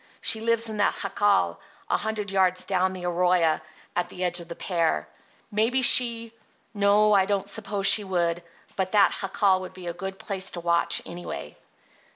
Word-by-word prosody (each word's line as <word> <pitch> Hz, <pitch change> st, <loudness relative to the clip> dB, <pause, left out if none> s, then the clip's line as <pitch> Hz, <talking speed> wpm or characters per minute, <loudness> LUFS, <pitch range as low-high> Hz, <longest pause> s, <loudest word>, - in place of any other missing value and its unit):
She 220 Hz, -, +1 dB
lives 230 Hz, 0 st, +2 dB
in 215 Hz, -1 st, -4 dB
that 205 Hz, -, +1 dB
jacal 200 Hz, -, 0 dB, 0.3 s
a -, -, +1 dB
hundred 215 Hz, -2 st, -4 dB
yards 185 Hz, -1 st, +1 dB
down 185 Hz, -1 st, 0 dB
the 180 Hz, -1 st, -7 dB
arroyo 175 Hz, -2 st, +1 dB, 0.3 s
at 175 Hz, 0 st, -1 dB
the 180 Hz, -, -6 dB
edge 180 Hz, 0 st, 0 dB
of 170 Hz, -, -10 dB
the 170 Hz, -, -8 dB
pear. 165 Hz, -, -1 dB, 0.4 s
Maybe 230 Hz, +5 st, +1 dB
she—no, 225 Hz, -3 st, +2 dB
I 195 Hz, -2 st, +4 dB
don't 200 Hz, -1 st, -1 dB
suppose 200 Hz, -1 st, -3 dB
she 210 Hz, -, +6 dB
would, 175 Hz, -3 st, -1 dB, 0.3 s
but 190 Hz, 0 st, -2 dB
that 205 Hz, -2 st, +4 dB
jacal 195 Hz, -1 st, +1 dB
would 185 Hz, -, -9 dB
be 185 Hz, -1 st, -11 dB
a 170 Hz, -, -4 dB
good 190 Hz, +2 st, -7 dB
place 195 Hz, -1 st, -2 dB
to -, -, -3 dB
watch, 170 Hz, 0 st, 0 dB
anyway." 120 Hz, -, -8 dB
190 Hz, 175 wpm, -25 LUFS, 175-210 Hz, 0.4 s, she